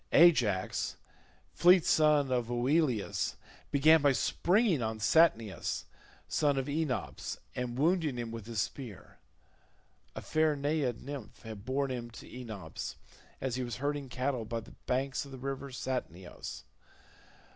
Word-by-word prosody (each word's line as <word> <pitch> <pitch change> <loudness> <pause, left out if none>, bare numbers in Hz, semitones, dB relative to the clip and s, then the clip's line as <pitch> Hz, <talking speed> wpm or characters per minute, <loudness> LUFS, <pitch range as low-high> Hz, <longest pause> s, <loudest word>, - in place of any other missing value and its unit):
Ajax 120 - +4 0.6
fleet 180 0 +6
son 150 -3 +4
of 120 -2 0
Oileus 125 -1 +1 0.3
began 155 +3 +6
by 145 -1 +5
springing 180 - +2
on 110 -1 -2
Satnius 115 - +2 0.4
son 145 -2 +2
of 135 - 0
Enops, 145 -2 -2 0.2
and 125 -1 -3
wounding 160 -2 +2
him 120 -1 -4
with 115 -2 -7
his 115 -2 -3
spear: 110 -1 -5 1.0
a - - -5
fair 155 -1 +2
naiad 145 -4 -1
nymph 130 -5 -8
had 110 -2 -8
borne 135 +1 0
him 120 -2 -4
to 115 - -11
Enops 110 -10 -7 0.4
as 130 -2 -2
he 130 - -1
was 120 -3 -4
herding 145 +2 -2
cattle 125 -1 -1
by 115 +1 -3
the 110 - -13
banks 135 +2 0
of 140 - -11
the 135 - -8
river 135 +1 -4
Satnioeis. 125 - -5
130 Hz, 135 wpm, -31 LUFS, 115-145 Hz, 1.0 s, fleet